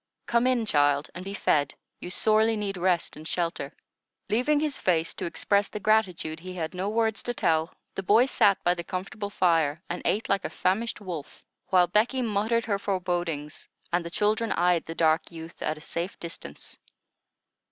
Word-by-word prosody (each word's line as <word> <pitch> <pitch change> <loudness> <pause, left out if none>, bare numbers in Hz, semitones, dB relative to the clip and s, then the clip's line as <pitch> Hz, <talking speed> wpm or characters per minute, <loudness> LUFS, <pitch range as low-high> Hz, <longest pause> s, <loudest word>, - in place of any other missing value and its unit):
Come 235 +1 +2
in, 250 -3 +2
child, 145 -5 +2
and 180 - -6
be 195 +1 -5
fed: 145 -7 +1 0.2
you 175 - -7
sorely 220 +3 +3
need 200 -2 -2
rest 180 -1 +1
and 155 +1 -9
shelter." 175 +3 -2 0.6
Leaving 255 +7 +3
his 300 -2 -1
face 165 -3 +1
to - - -5
express 200 +4 +1
the 210 - -5
gratitude 190 -7 +1
he 185 +2 -8
had 160 -1 -3
no 185 +2 -2
words 225 0 +1
to 245 - -3
tell, 160 -2 +1 0.2
the - - -3
boy 215 +6 +5
sat 210 -7 +4
by 175 - +4
the 175 -1 -5
comfortable 195 +4 -5
fire 165 -6 +2
and 175 - -3
ate 215 - 0
like 195 -1 +1
a - - -2
famished 210 +4 -1
wolf, 170 -7 -7 0.2
while 180 -2 +5
Becky 225 +8 +1
muttered 220 +1 +1
her 200 -3 0
forebodings 175 -6 -2 0.2
and 175 0 +2
the 170 - -6
children 215 +4 +1
eyed 175 -1 +2
the 165 - -5
dark 160 0 +2
youth 165 0 -10
at 155 - -1
a - - -12
safe 170 +4 -4
distance. 165 - -8
185 Hz, 185 wpm, -27 LUFS, 165-215 Hz, 0.6 s, boy